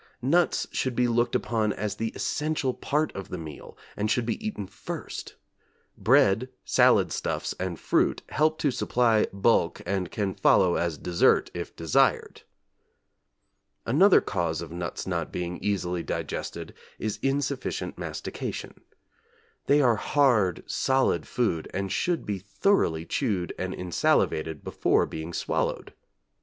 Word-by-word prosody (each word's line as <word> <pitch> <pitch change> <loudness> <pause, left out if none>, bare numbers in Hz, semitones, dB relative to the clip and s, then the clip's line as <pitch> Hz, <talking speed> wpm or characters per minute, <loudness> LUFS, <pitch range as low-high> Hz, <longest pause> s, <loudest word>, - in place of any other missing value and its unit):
Nuts 170 +7 +2
should 130 -2 -1
be 125 0 +2
looked 120 0 +1
upon 110 -3 0
as 105 +1 -3
the 115 0 -2
essential 150 -3 -1
part 150 +4 -1
of 95 - -6
the 90 - -4
meal 80 -3 -9 0.2
and 105 +1 -1
should 120 +2 +1
be 120 - -3
eaten 215 - -3
first; - - -7 0.6
bread, 110 +7 +3 0.2
salad - - +4
stuffs - - -2
and 90 -2 -3
fruit - - +1
help 155 +1 +2
to 145 - +1
supply 120 -3 +2
bulk 100 -3 +2
and 95 -3 -1
can 100 -3 -2
follow 90 -1 +4
as 85 -3 -1
dessert 90 -1 +2
if - - -6
desired. 80 -2 +1 1.4
Another 180 - +5
cause 85 -5 -2
of 85 -1 -7
nuts 85 +1 -4
not 85 -3 -2
being 90 0 -4
easily 90 -4 -1
digested - - -5 0.2
is 110 0 -3
insufficient 135 0 -2
mastication. - - -5 0.9
They 145 +1 +5
are 120 -4 +4
hard, 115 - +2
solid 135 0 +1
food, 110 -11 -1
and 95 0 -2
should 175 -2 0
be 100 -2 -2
thoroughly 100 - +1
chewed 100 -9 -1
and 95 0 -2
insalivated 80 -3 0
before - - +2
being 80 +1 -6
swallowed. - - -2
105 Hz, 135 wpm, -27 LUFS, 90-130 Hz, 1.4 s, Another